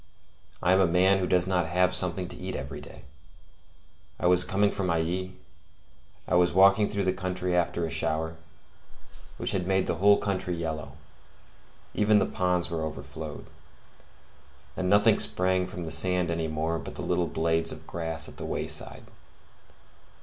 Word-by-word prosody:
I 90 - +4
am 95 - +4
a 95 - +4
man 95 +3 +3
who 90 - -1
does 90 -1 +3
not 90 -3 0
have 90 +2 +2
something 90 0 0
to - - -9
eat - - -5
every - - -6
day. 65 - -12 1.2
I - - -3
was 90 0 +5
coming 100 +2 +1
from 95 - -2
Ailly; 85 +3 -1 0.9
I - - -2
was 90 -1 +4
walking 100 +3 +5
through 100 -1 -1
the 95 -1 +1
country 90 -1 -2
after 85 -1 0
a 80 - -5
shower, 80 +2 -1 1.0
which - - -2
had 90 -2 -2
made 95 -1 +2
the 85 - -2
whole 100 0 +6
country 95 -3 -2
yellow: 80 -4 -5 1.0
even 105 0 +3
the - - +3
ponds 90 -1 -1
were 80 -1 -2
overflowed, 75 0 -7 1.3
and 90 - -2
nothing 100 +1 +4
sprang 90 0 +1
from 90 -2 -7
the 80 - -6
sand 90 +1 +2
any 85 -1 -2
more 80 +1 -2
but - - -9
the - - -6
little 90 -1 0
blades 80 0 0
of - - -10
grass 80 -2 -3
at - - -12
the - - -7
wayside. - - -2
90 Hz, 165 wpm, -27 LUFS, 80-95 Hz, 1.3 s, whole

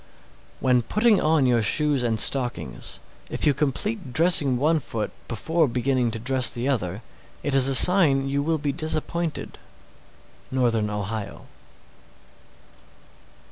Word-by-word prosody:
_ - - -28 0.6
630. - - -7
When 125 -1 +3
putting 215 - +1
on 155 -3 +2
your 120 -2 +2
shoes 145 +6 +1
and 115 -2 -1
stockings, 125 0 -1 0.3
if - - -4
you 145 - +3
complete 150 - -3
dressing 155 -5 +2
one 155 +5 +1
foot 115 -6 -5 0.2
before 160 +8 -1
beginning 125 0 -1
to 115 - -5
dress 130 +2 +4
the 120 +2 -4
other, 105 -6 -3 0.4
it 145 - -2
is 135 -1 +6
a 135 - +2
sign 145 -5 +5
you 140 +1 -1
will 160 +2 -1
be 145 -1 -3
disappointed. 160 +2 -4 0.9
_Northern 115 -5 0
Ohio. 105 0 -6
135 Hz, 140 wpm, -23 LUFS, 120-155 Hz, 0.9 s, is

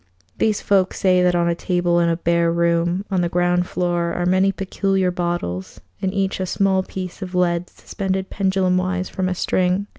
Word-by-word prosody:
These 215 -2 +1
folk 190 -2 +2
say 185 -1 +3
that 180 0 +3
on 170 0 +2
a 170 - +2
table 175 0 0
in 170 -1 +2
a 165 - 0
bare 170 0 +1
room 170 +2 +1
on 185 -2 +1
the 175 - 0
ground 175 0 +1
floor 175 -2 -1
are 175 - -1
many 185 +2 +3
peculiar 195 -1 0
bottles, 170 - -3 0.2
in 190 - -1
each 195 -1 -1
a 185 - -2
small 190 0 +2
piece 185 0 -7
of 185 -1 -6
lead 175 -1 +1
suspended 190 -1 -4
pendulum 190 -2 +1
wise 185 0 -1
from 185 -1 -2
a 185 - -2
string. 185 +2 0
180 Hz, 190 wpm, -21 LUFS, 175-190 Hz, 0.2 s, say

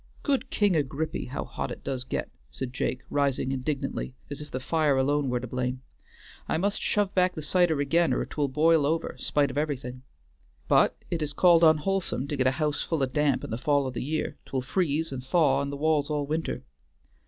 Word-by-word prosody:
"Good 275 -3 0
King 205 -4 +2
Agrippy! 150 +1 -1
how - - -4
hot - - -4
it - - -8
does 130 -2 -3
git," - - -3 0.2
said 125 - -5
Jake 125 0 -2
rising 140 -2 +1
indignantly, 135 -1 -3 0.2
as 145 - -5
if 150 - -9
the 130 - -4
fire 150 0 +1
alone 140 +1 +1
were 125 0 0
to 125 - -6
blame. 125 +1 -3 0.7
"I - - +1
must 200 +4 0
shove 205 -2 +1
back 180 -1 +2
the 155 - -5
cider 170 -1 +2
again 165 +5 +2
or - - 0
't - - -12
will 145 -2 +1
bile 155 +2 +3
over, 160 +2 -1
spite 145 -2 +1
of 140 - -1
everything. 130 -4 -3 0.7
But - - +4
't 170 -2 -1
is 150 -1 -2
called 170 +1 +5
unwholesome 160 -2 +2
to 145 - -1
get 130 -2 +2
a - - +4
house 150 -1 0
full 160 -5 -1
o' - - +5
damp 140 0 +1
in - - -6
the 110 - -2
fall 145 0 +2
o' 130 - -2
the 120 - -4
year; 155 +3 -2
't - - -20
will 130 -1 0
freeze 150 +2 0
an' 130 - -4
thaw 140 0 +3
in 140 - -2
the 140 - -5
walls 150 -1 +1
all 150 -1 -1
winter. 155 +3 -2
145 Hz, 220 wpm, -27 LUFS, 130-160 Hz, 0.7 s, called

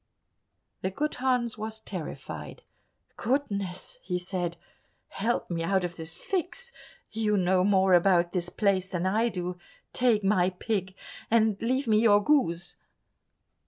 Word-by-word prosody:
The 190 - 0
good 300 +11 -2
Hans 245 -3 0
was 220 +1 -4
terrified. 135 - -7 0.5
"Goodness!" 200 -8 -2
he 180 -1 -2
said, 180 -1 -3 0.5
"help 225 -1 -1
me 165 -1 -1
out 190 +2 +1
of 175 0 -3
this 160 -1 -8
fix; 390 +6 -3 0.4
you 215 -1 +1
know 185 0 +3
more 190 -1 +4
about 175 -1 +4
this 180 -1 -2
place 190 -3 +1
than 180 -1 -2
I 220 +5 +2
do, 180 -3 -4 0.3
take 235 -4 +3
my 190 -2 +3
pig 190 0 -3 0.3
and 220 -2 +4
leave 260 +4 0
me 215 -1 +4
your 205 -2 +5
goose." 175 - +1
195 Hz, 135 wpm, -28 LUFS, 180-225 Hz, 0.5 s, your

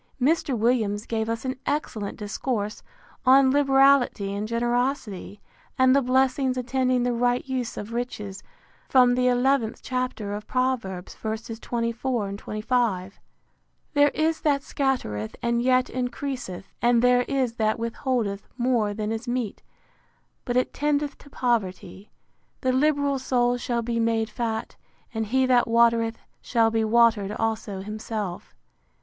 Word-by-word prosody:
Mr. 275 -1 +1
Williams 220 -2 +1
gave 220 -1 -2
us 230 +2 -3
an 260 0 -2
excellent 225 -9 -2
discourse 210 0 -3 0.4
on 265 +1 +6
liberality 270 -7 +4
and 205 +1 -3
generosity, 235 -4 -1 0.4
and 260 0 +5
the 280 - +4
blessings 260 0 +2
attending 255 0 +1
the 245 0 +1
right 245 +2 +1
use 255 -3 -3
of 210 +3 -6
riches, 210 -5 -4 0.5
from 250 -2 +5
the 250 0 +2
xith 250 -2 +2
chapter 250 -5 -3
of 210 0 -6
Proverbs, 240 -8 -1
ver. 220 0 -3
24, 230 0 -3
25. 210 -2 -2 0.7
There 290 0 +5
is 315 +1 +1
that 280 -2 +1
scattereth, 250 - -2
and 235 0 0
yet 255 0 +3
increaseth; 250 -6 -5
and 240 0 +3
there 250 0 +5
is 260 -4 0
that 215 -1 +1
withholdeth 230 -3 -2
more 240 -5 +1
than 215 0 -2
is 225 +2 -4
meet, 240 -4 -2 0.8
but 245 -1 0
it 255 - +1
tendeth 295 0 0
to 285 - -16
poverty. 200 -6 -2 0.5
The 260 - +2
liberal 285 0 +2
soul 245 -1 +1
shall 240 -1 -2
be 230 0 -1
made 225 -1 +1
fat: 225 -2 -3 0.4
And 220 -1 -2
he 260 +4 +2
that 250 -2 +3
watereth, 230 -1 +3 0.2
shall 225 -1 +2
be 225 0 +1
watered 220 -3 +3
also 220 -3 -2
himself. 210 -2 -5
240 Hz, 135 wpm, -25 LUFS, 220-260 Hz, 0.8 s, on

